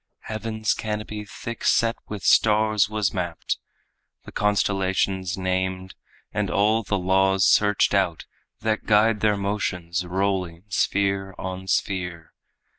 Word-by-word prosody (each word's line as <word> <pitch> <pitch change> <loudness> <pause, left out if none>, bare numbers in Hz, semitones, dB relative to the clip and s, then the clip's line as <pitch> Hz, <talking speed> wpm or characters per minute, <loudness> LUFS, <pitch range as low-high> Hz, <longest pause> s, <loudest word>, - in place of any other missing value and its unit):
Heaven's 110 0 -2
canopy 105 -1 -4
thick 115 +3 -7
set 115 0 +3
with 105 -3 -6
stars 110 -1 +4
was 105 -2 0
mapped, 85 -4 -3 0.7
The - - -10
constellations 95 -2 0
named, 95 0 -2 0.4
and - - -1
all 110 +3 +2
the 105 -2 -1
laws 95 +1 +3
searched 105 -1 +3
out 95 -5 +1 0.4
That 110 0 -1
guide 105 0 +4
their 105 0 +2
motions, 90 -3 -2
rolling 90 -2 -2
sphere 95 0 0
on 95 0 -6
sphere. 90 -3 -2
100 Hz, 115 wpm, -24 LUFS, 95-105 Hz, 0.7 s, stars